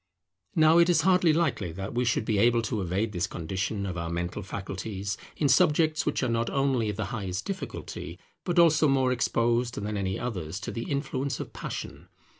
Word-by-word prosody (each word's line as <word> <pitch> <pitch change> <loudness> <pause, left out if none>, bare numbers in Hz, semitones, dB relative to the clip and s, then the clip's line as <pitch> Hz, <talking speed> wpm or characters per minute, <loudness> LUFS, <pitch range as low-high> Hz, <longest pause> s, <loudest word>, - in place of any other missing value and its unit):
Now 160 +1 +6
it 170 +1 +5
is 170 -2 +4
hardly 180 -1 +4
likely 150 - 0
that 95 +5 -5
we 125 +1 +1
should 115 -2 +1
be 105 -2 +1
able 115 +1 +4
to 110 -1 -2
evade 95 +5 -1
this 95 +1 -1
condition 95 +4 -3
of 90 -3 -4
our 85 0 -3
mental 85 +4 -3
faculties 100 +1 -4 0.2
in 150 - +2
subjects 155 -1 +3
which - - 0
are - - +2
not 115 0 0
only 135 -5 +1
of 105 - -3
the - - -2
highest 95 -3 -3
difficulty, 195 -1 -6 0.3
but 175 -1 -2
also 160 -2 +6
more 135 -2 +3
exposed 120 0 +1
than 105 +1 -3
any 95 -1 -1
others 95 -8 -4
to - - -4
the 115 - -5
influence 140 -2 -2
of - - -6
passion. - - -6
115 Hz, 195 wpm, -28 LUFS, 100-140 Hz, 0.3 s, Now